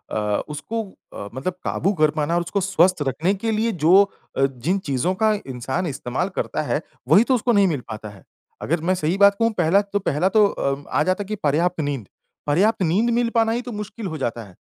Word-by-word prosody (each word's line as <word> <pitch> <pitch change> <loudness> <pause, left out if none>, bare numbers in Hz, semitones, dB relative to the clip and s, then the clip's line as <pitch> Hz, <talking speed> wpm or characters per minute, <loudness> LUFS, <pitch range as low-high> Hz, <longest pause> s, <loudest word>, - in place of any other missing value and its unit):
अ, 105 -1 0
उसको 215 +10 -4 0.3
अ, 100 - -7
मतलब 135 +8 -3
काबू 195 - 0
कर 155 -1 +5
पाना 155 +2 -1
और 175 - +2
उसको 190 +3 -2
स्वस्थ 185 -2 +2
रखने 160 +9 0
के 225 - +1
लिए 220 +1 +1
जो 185 +5 +7 0.4
अ, 135 - +4
जिन 135 +9 -1
चीज़ों 140 +7 0
का 220 +3 +2
इंसान 130 +7 -3
इस्तेमाल 135 +5 -3
करता - - -2
है, 150 0 -1 0.3
वही 210 - +6
तो 260 +1 +2
उसको 240 +1 +1
नहीं 200 -3 +4
मिल 150 -7 -1
पाता 105 -1 -6
है। 100 -3 -15 0.4
अगर 165 +2 -1
मैं 185 - +3
सही 170 +2 -1
बात 200 0 +6
कहूँ 230 0 +3
पहला 175 +4 +4
तो 205 0 -3
पहला 175 0 0
तो 210 +1 +5
अ, 140 -5 -2
आ 150 - +1
जाता 185 +4 0
है - - -13
कि 215 - -3
पर्याप्त 165 +5 +1
नींद। 140 -8 -3 0.4
पर 145 +2 +1
ये 190 - +5
आपकी 215 -4 +2
नींद 205 +9 +2
मिल 240 -1 +1
पाना 225 -1 +3
ही 235 +2 -1
तो 245 0 -8
मुश्किल 210 0 -6
हो 160 - -5
जाता 120 -4 -3
है। 95 -4 -16
175 Hz, 235 wpm, -22 LUFS, 145-205 Hz, 0.4 s, जो